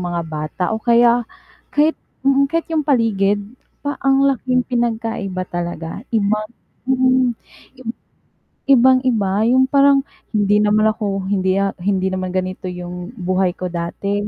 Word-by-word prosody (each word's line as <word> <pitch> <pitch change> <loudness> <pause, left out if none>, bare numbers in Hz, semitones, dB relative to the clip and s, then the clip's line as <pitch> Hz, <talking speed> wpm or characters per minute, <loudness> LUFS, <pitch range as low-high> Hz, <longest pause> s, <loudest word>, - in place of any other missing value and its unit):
mga 175 -1 -2
bata 155 +3 -4
o 220 - -2
kaya 235 0 +4 0.5
kahit 305 +2 +3 0.3
mm, 275 0 +3
kahit 330 +2 -1
yung 320 - +2
paligid, 210 -7 +2 0.4
pa 285 - -2
ang 270 0 +4
laking 255 -1 +1
pinagkaiba 225 -6 -2
talaga. 175 0 -5
Iba 215 -1 +1 0.5
mm, 255 0 +3 0.5
ib 245 - -9 0.8
ibang-iba 240 -6 +3
yung 260 +1 +4
parang 280 0 +5 0.3
hindi 205 0 +3
naman 210 +1 +3
ako, 200 -3 -3
hindi 190 -1 +1
ya 195 0 0
hindi 190 0 0
naman 185 0 -3
ganito 185 0 -3
yung 180 0 -7
buhay 185 -1 0
ko 185 - -5
dati, 200 +4 -3
210 Hz, 135 wpm, -19 LUFS, 185-255 Hz, 0.8 s, parang